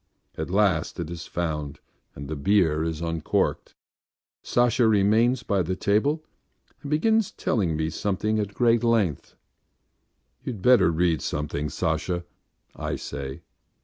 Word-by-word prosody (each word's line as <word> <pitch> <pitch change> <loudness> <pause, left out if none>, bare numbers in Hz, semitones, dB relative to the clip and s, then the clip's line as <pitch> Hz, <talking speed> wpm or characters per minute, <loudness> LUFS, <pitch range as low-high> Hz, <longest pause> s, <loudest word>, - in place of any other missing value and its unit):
At 80 - -4
last 95 -4 +1
it 85 -1 -4
is 85 -1 -7
found 75 -4 -3 0.4
and 70 +1 -7
the 80 - -4
beer 80 -1 +2
is 80 -1 -3
uncorked. 85 -2 -1 0.7
Sasha 120 -1 +2
remains 110 +4 +3
by 100 -5 +1
the 90 +2 -2
table 125 - +1 0.6
and 145 - -7
begins 220 +8 +2
telling 95 -10 -1
me 80 +1 -1
something 105 +5 -1
at 105 -1 -3
great 120 -1 +3
length. 110 - 0 1.1
"You'd 120 -9 -6
better 125 -7 +6
read 85 0 +1
something, 75 0 -3
Sasha," 85 -1 -2 0.5
I - - -3
say. 70 -1 -6
95 Hz, 130 wpm, -25 LUFS, 80-115 Hz, 1.1 s, better